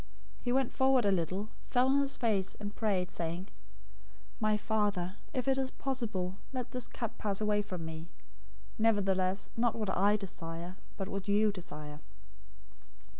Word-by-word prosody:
026:039 - - -22
He 245 - +2
went 265 0 +3
forward 265 -3 +4
a 200 - +5
little, 190 +4 0
fell 250 0 +3
on 275 +1 +5
his 280 0 +1
face, 210 -6 +1
and 205 0 -5
prayed, 195 -5 +1
saying, 170 +3 -3 0.9
"My 215 -2 +3
Father, 205 -4 0
if 255 0 -1
it 270 0 +4
is 265 -1 +1
possible, 220 -10 -2
let 255 -3 -3
this 250 -1 -3
cup 230 -2 -5
pass 200 -2 0
away 210 -1 +3
from 185 -5 -5
me; 160 +1 -6 0.7
nevertheless, 195 -3 +2
not 235 0 +2
what 210 -4 -1
I 205 +2 +5
desire, 175 -2 -5 0.2
but 195 - -2
what 195 -1 -4
you 210 +1 +4
desire." 150 -6 -7
205 Hz, 160 wpm, -33 LUFS, 185-230 Hz, 0.9 s, a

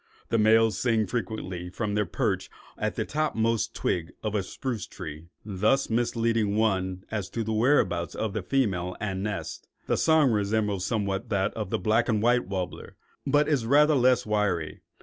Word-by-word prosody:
The 115 - +2
males 110 0 +4
sing 115 -3 +2
frequently 100 -6 -4
from 105 +2 -3
their 105 -2 0
perch - - -1 0.3
on - - -1
the - - -1
topmost 115 -8 0
twig 85 -2 -2
of 105 -1 -2
a 105 - +1
spruce 115 +3 -4
tree, 80 -3 -8 0.2
thus 110 +6 +1
misleading 115 -2 +1
one 95 -4 0
as 105 -4 -3
to 115 - -3
the 110 +1 -2
whereabouts 110 -7 +2
of 110 -3 -2
the 105 - -2
female 90 -6 0
and 95 -3 -3
nest. 105 0 -5 0.2
The - - 0
song 160 -5 +4
resembles 105 -2 0
somewhat 105 -1 -2
that 100 -2 0
of 105 -4 -4
the - - 0
black 110 +6 +1
and 110 -2 +2
white 120 +1 +2
warbler, 95 -2 -5 0.3
but 145 +2 +3
is 140 -7 +1
rather 150 +4 +5
less 130 -2 +3
wiry. 105 -8 -1
110 Hz, 170 wpm, -27 LUFS, 95-115 Hz, 0.3 s, rather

